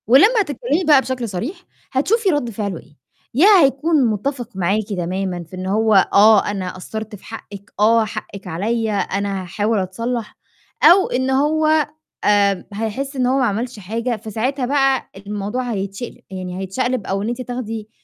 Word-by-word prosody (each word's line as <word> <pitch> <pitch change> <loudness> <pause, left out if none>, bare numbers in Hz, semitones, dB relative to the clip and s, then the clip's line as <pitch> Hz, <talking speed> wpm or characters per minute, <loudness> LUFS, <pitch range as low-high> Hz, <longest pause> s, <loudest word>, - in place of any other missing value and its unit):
ولمّا 410 - +6
هتتكلِّمي 290 - -1
بقى 295 -5 +6
بشكل 255 -3 -3
صريح، 295 - -5 0.3
هتشوفي 390 - +1
رَد 290 -8 0
فعله 200 -5 -4
إيه، 150 - -20 0.4
يا 305 - +5 0.2
هيكون 280 +1 +2
مُتّفق 240 +3 -2
معاكِ 190 +4 +1
تمامًا 185 -1 -3
في 165 +3 -12
إن 185 0 -5
هو 220 +3 +2 0.2
"آه، 210 +1 +6
أنا 185 -3 -4
قصّرت 220 +3 -6
في 195 - -16
حقِّك، 205 -2 -10
آه 225 +1 +4
حقِّك 200 -1 -8
عليّا، 220 +5 -1
أنا 200 -1 -1
هاحاول 205 +4 -1
أتصلّح"، 230 +4 -4 0.5
أو 375 +2 +7
إن 260 +1 0
هو 310 +3 +3 0.4
آآ 200 -2 +3
هيحس 225 +7 -3
إن 255 -2 +1
هو 260 +2 +2
ما 255 - +3
عملش 230 +2 -2
حاجة، 230 +5 -2
فساعتها 230 +6 -2
بقى 270 0 +1
الموضوع 210 +5 -4
هيتشقل 200 +3 -5
يعني 185 -1 -6
هيتشقلب 245 +4 -2
أو 195 +1 -1
إن 215 - -2
أنتِ 240 +1 -3
تاخدي 225 -3 -5
225 Hz, 160 wpm, -20 LUFS, 200-265 Hz, 0.5 s, أو